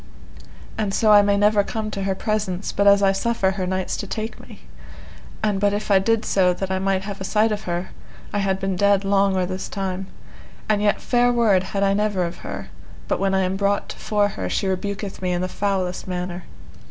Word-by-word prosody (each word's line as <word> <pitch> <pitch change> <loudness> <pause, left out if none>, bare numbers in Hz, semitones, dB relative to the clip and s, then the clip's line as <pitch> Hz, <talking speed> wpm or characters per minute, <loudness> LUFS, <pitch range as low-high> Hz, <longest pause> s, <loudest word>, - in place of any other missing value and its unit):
And 200 -3 0
so 215 -1 +4
I 205 -1 +8
may 200 0 +2
never 205 0 +4
come 215 +1 -4
to 200 - -4
her 195 -1 0
presence, 205 -3 -2
but 200 0 +1
as 200 0 +6
I 195 - +5
suffer 195 -1 0
her 190 -1 -3
knights 185 0 -2
to 200 - -5
take 220 +3 -5
me, - - -14 0.8
and 205 -2 +1
but 205 0 +2
if 210 0 -3
I 195 - +6
did 225 +3 +1
so 180 -2 +3
that 190 0 -4
I 190 - 0
might 190 0 0
have 200 0 -6
a - - -2
sight 215 +3 +2
of 210 0 -3
her, 175 +1 -3 0.4
I 205 - +1
had 195 -1 0
been 195 -1 -1
dead 200 +1 +3
long 195 0 +3
or 185 - +1
this 185 +1 -5
time; 190 -1 -4 0.6
and 210 -1 +2
yet 210 -1 +2
fair 245 0 +2
word 225 -6 +3
had 200 +1 -2
I 195 0 +3
never 205 -2 0
of 170 +1 -6
her, - - -7 0.4
but - - 0
when 195 0 +1
I 190 - +2
am 185 +1 -1
brought 200 0 0
to - - -7
fore 205 -1 +1
her 95 - -4
she - - -1
rebuketh 195 +1 -3
me 180 -1 0
in 175 - -1
the 185 - -1
foulest 185 -2 -2
manner. 180 -1 -4
195 Hz, 225 wpm, -22 LUFS, 190-205 Hz, 0.8 s, I